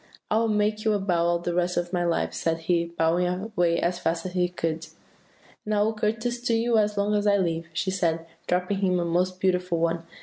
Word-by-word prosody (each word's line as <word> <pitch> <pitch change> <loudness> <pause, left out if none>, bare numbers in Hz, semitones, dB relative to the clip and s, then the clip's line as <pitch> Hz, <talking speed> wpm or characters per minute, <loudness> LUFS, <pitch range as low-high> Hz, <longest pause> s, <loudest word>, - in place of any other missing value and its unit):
"'I 215 - +3
will 230 - +2
make 210 0 +1
you 220 - +2
a 205 - +1
bow 175 -3 +1
all 170 0 +2
the 175 0 -3
rest 180 0 0
of 175 +1 -2
my 175 -1 +1
life,' 170 -1 0
he - - -7 0.5
said, 170 - -18
bowing 170 +2 +2
away 180 -2 0
as 175 +1 0
fast 165 0 -1
as 185 - -3
he 180 -1 +1
could. 165 -2 -3 0.8
"'And 210 0 -1
I 205 - +3
will 220 +1 +1
courtesy 225 +3 -2
to 235 - +2
you 230 0 +2
as 210 -1 0
long 200 +1 +1
as 210 0 +1
I 200 0 +5
live,' 165 -3 -1
she 190 +3 -1
said, 165 -3 0 0.2
dropping 180 +2 0
him 185 -2 +2
a 170 - 0
most 180 +2 0
beautiful 180 -2 +1
one. 165 0 0
180 Hz, 235 wpm, -26 LUFS, 170-210 Hz, 0.8 s, I